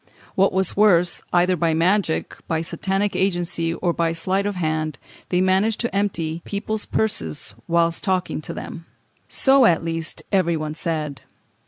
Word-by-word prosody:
What 195 +1 +3
was 190 -1 0
worse, 180 -4 +4
either 180 +1 +3
by 165 -1 +1
magic, 175 0 +1
by 160 -1 0
Satanic 195 +4 -1
agency, 175 -3 0
or 175 -2 0
by 165 -1 0
sleight 190 +4 0
of 205 - -2
hand, 155 -3 -1 0.3
they 180 0 +2
managed 190 +4 +2
to 235 -5 -2
empty 170 -5 -1
people's 215 +1 -3
purses 90 - -1
whilst 170 0 +2
talking 185 -4 -1
to - - -6
them.... 165 0 -8 0.4
So, 270 -1 +4
at 165 -1 +2
least, 165 0 -3
every 175 -4 +2
one 155 -1 -4
said. 155 -4 -3
175 Hz, 155 wpm, -22 LUFS, 165-195 Hz, 0.4 s, worse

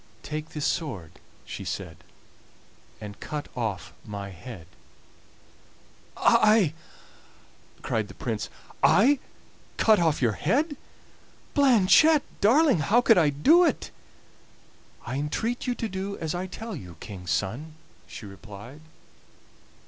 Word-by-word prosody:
"Take 155 +1 -5
this 150 -2 -4
sword," 115 - -2 0.3
she - - -7
said, 80 - -5 1.0
"and 105 -1 -9
cut 150 -1 -5
off 110 -6 -3
my 100 -2 -6
head!" 95 -1 -10 1.5
"I!" 215 -7 +4 1.1
cried 110 -2 -1
the - - -13
Prince, 110 -4 -3 0.3
"I 240 - +5 0.6
cut 220 -3 +5
off 160 -3 +2
your 120 -4 +2
head! 285 - 0 0.8
Blanchette 275 +4 +5 0.2
darling, 255 - +5
how 215 +11 +3
could 225 -5 +5
I 155 -3 +4
do 290 - +5
it?" 345 - 0 1.1
"I 130 - -3
entreat 220 - -2
you 245 - 0
to 230 - -3
do 195 0 -4
as 160 0 -3
I 180 +1 -3
tell 220 +3 -7
you, 90 - -10
King's 90 -4 -8
son," 130 - -2 0.3
she 110 - -9
replied. 105 - -11
155 Hz, 120 wpm, -26 LUFS, -, 1.5 s, I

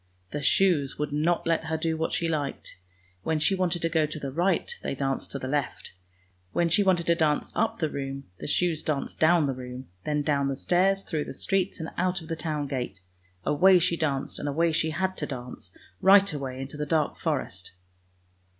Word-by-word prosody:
The 145 - -3
shoes 150 -2 +2
would 150 0 -2
not 165 +4 +1
let 165 -1 +1
her 160 0 -1
do 160 0 0
what 160 0 -1
she 170 - 0
liked: 145 - -3 0.4
when 160 - 0
she 155 +6 +2
wanted 180 -3 0
to - - +3
go 160 -2 +2
to 155 - -6
the 140 -2 -4
right, 175 +4 +1
they - - -3
danced 135 0 -2
to - - -3
the 130 - -5
left: 145 +1 -2 0.6
when 170 -1 +2
she 165 +5 +4
wanted 180 -3 +2
to 170 - +4
dance 155 -3 +1
up 225 - 0
the 160 - 0
room, 140 -1 -5 0.2
the - - -6
shoes 165 +1 +1
danced 150 -3 -2
down 160 0 +5
the 135 - 0
room, 125 0 -8
then 150 -1 0
down 140 -2 +1
the 135 - -1
stairs, 190 +6 +2
through 155 -3 -2
the - - -7
streets 195 -1 -1
and 160 - -4
out 180 0 +1
of 160 -1 -12
the 165 - -1
town 155 -2 -2
gate. 130 -7 -4 0.4
Away 185 +6 +6
she 170 0 +2
danced, 145 -5 -1
and 145 - -2
away 165 +4 +2
she 160 0 +1
had 190 +4 -1
to - - -2
dance, 125 -2 -7 0.3
right 200 -1 +6
away 135 -3 -4
into 135 +3 -6
the 150 0 -3
dark 155 -1 +1
forest. - - -3
155 Hz, 210 wpm, -27 LUFS, 140-170 Hz, 0.6 s, Away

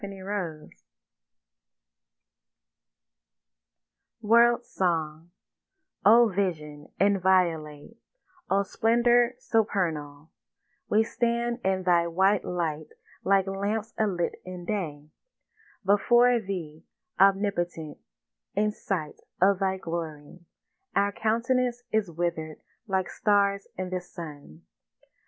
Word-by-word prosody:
WORLD 235 +2 +4
SONG 165 -2 -2 0.7
O 235 +3 +7
Vision 155 -7 -3
inviolate, 185 -3 +1 0.5
O 200 +1 +2
Splendour 240 +3 +2
supernal, 165 - -1 0.6
We 215 +1 +4
stand 235 +1 -1
in 190 0 0
Thy 175 -2 +3
white 190 +4 +2
light 160 -4 -3 0.4
like 195 -1 +3
lamps 205 +3 -3
alit 190 -6 -1
in 180 -1 -8
day; 160 -8 -3 0.8
Before 240 +5 +4
Thee, 175 -7 -6 0.4
Omnipotent, 190 -5 +1 0.6
in 210 +1 +2
sight 180 -7 -4 0.2
of 195 +1 +4
Thy 190 -1 0
glory, 165 -2 -6 0.6
Our 200 +1 +2
countenance 245 +3 0
is 215 -4 +1
witherèd 160 -2 -3 0.3
like 190 -2 0
stars 200 -1 +1
in 185 0 -4
the 185 0 -2
sun. 145 - -11
190 Hz, 85 wpm, -27 LUFS, 170-215 Hz, 0.8 s, O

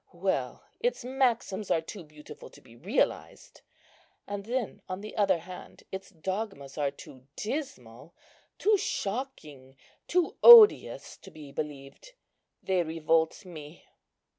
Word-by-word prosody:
Well, - - -2 0.2
its 485 - -2
maxims 245 -6 -1
are - - +3
too 175 +4 -9
beautiful 150 -1 -13
to - - -17
be 115 - -19
realized; 190 - -2 0.7
and 205 0 -5
then 240 -1 -3
on 185 +1 -5
the 215 - -9
other 195 -4 +2
hand, 180 +2 -12
its 190 0 -7
dogmas 190 -5 -5
are 145 -2 0
too 130 -1 -14
dismal, 170 - -6 0.4
too 420 0 +3
shocking, 155 - -5 0.3
too 355 -1 0
odious 465 -3 +8
to - - -14
be 150 -3 -12
believed. 145 - -8 0.5
They 190 -2 +1
revolt 160 +1 0
me." 155 -3 -11
185 Hz, 125 wpm, -28 LUFS, 150-225 Hz, 0.7 s, odious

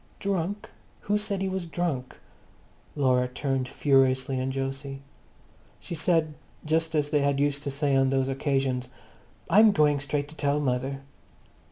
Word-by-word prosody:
"Drunk! 200 0 -2 0.3
Who 205 +1 0
said 200 -2 -2
he - - 0
was 190 -2 -3
drunk?" 160 -7 -3 0.8
Laura 130 -3 +2
turned 130 0 -2
furiously 130 -1 +2
on 130 +1 -2
Jose. 135 +1 -4 0.8
She - - -8
said, 165 -1 +1 0.3
just 160 +1 0
as 150 -1 0
they 150 - +3
had 140 -1 +1
used 145 0 +1
to 145 - -3
say 140 0 0
on 135 0 +3
those 135 0 +1
occasions, 135 -2 -1 0.6
"I'm 215 +4 +6
going 150 -5 +3
straight 140 +1 -2
up - - -17
to 155 - -13
tell 145 -1 0
mother." 135 0 -1
140 Hz, 155 wpm, -27 LUFS, 135-160 Hz, 0.8 s, I'm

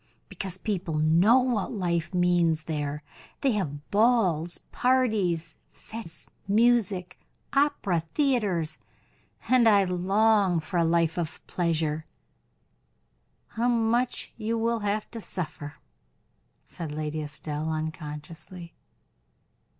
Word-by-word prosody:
"Because 190 -2 -5
people 190 -6 -3
know 170 +11 +5
what 240 -6 -1
life 170 -5 -1
means 175 -3 +2
there. 150 -2 -3 0.4
They 270 - +3
have 150 -9 -3
balls, 200 -7 +3
parties, 210 -11 +1 0.2
fetes, 220 -7 -10 0.2
music, 205 -4 +2 0.3
operas, 200 - +1
theaters, 205 - +1 0.7
and 250 -3 +5
I 200 -2 +5
long 195 +1 +2
for 160 +3 -4
a 170 - +4
life 165 0 +2
of 165 -2 -5
pleasure." 160 -3 -1 1.4
"How 230 +2 -1
much 240 +1 +1
you 230 +1 -1
will 230 +1 0
have 205 0 -1
to 230 - -6
suffer?" 155 -6 -5 0.9
said 165 -3 -7
Lady 155 +1 -3
Estelle, 150 +1 -4
unconsciously. 160 +2 -6
180 Hz, 105 wpm, -27 LUFS, 160-220 Hz, 1.4 s, know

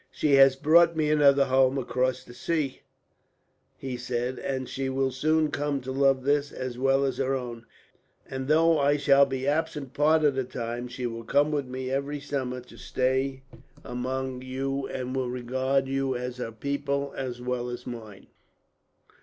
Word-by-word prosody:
"She 150 -2 0
has 135 -1 +7
brought 165 +4 +5
me 155 -1 +1
another 140 -2 +5
home, 130 0 +3
across 130 0 -1
the 120 - -13
sea," 150 -1 -2 1.0
he 130 -2 -5
said, 125 +1 -3
"but 130 -2 -2
she 135 0 -3
will 135 0 0
soon 155 +3 +1
come 145 -1 -1
to 130 +1 -5
love 135 -1 +2
this, 145 +1 +1
as 130 -1 -5
well 135 +2 +2
as 135 - -2
her 135 0 0
own; 120 -3 -6 0.6
and 130 0 -5
though 160 +1 +4
I 145 +1 +3
shall 140 -1 +5
be 135 0 -3
absent 150 -3 -1
part 155 +2 +3
of 145 -2 +4
the 130 0 -1
time, 120 -1 -5
she 125 0 -5
will 115 -1 -4
come 145 +6 +2
with 145 -3 -1
me 130 0 -5
every 140 +2 -2
summer 130 -3 -3
to 125 - -16
stay 130 +1 -1 0.4
among 130 +1 -3
you, 135 +1 -3
and 130 0 -4
will 130 -2 -1
regard 130 +2 0
you 135 -1 -1
as 125 0 -4
her 125 -2 -4
people, 140 +3 -2
as 125 -2 -4
well 125 0 -3
as 120 - -7
mine." 110 -5 -8
135 Hz, 175 wpm, -27 LUFS, 125-140 Hz, 1.0 s, has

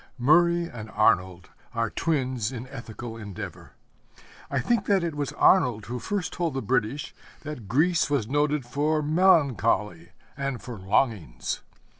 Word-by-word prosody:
Murray 170 +6 +4
and 115 -8 -8
Arnold 95 -5 +1 0.2
are 115 -2 0
twins 130 -7 -1
in 125 -1 -6
ethical 115 -1 -8
endeavor. 105 -4 -8 0.8
I 140 - -1
think 225 - 0
that 195 -3 +3
it 170 -2 -2
was 145 -1 -3
Arnold 125 - +4
who 125 +3 -4
first 195 - -3
told 170 -5 -2
the 135 - -1
British 125 +4 -1 0.3
that 150 -9 -7
Greece 155 - +2
was 140 -7 0
noted 145 0 +1
for 150 +5 0
melancholy 145 - +2 0.3
and 135 -3 -3
for 120 -5 -8
longings. 100 - -1
130 Hz, 140 wpm, -26 LUFS, 115-155 Hz, 0.8 s, Murray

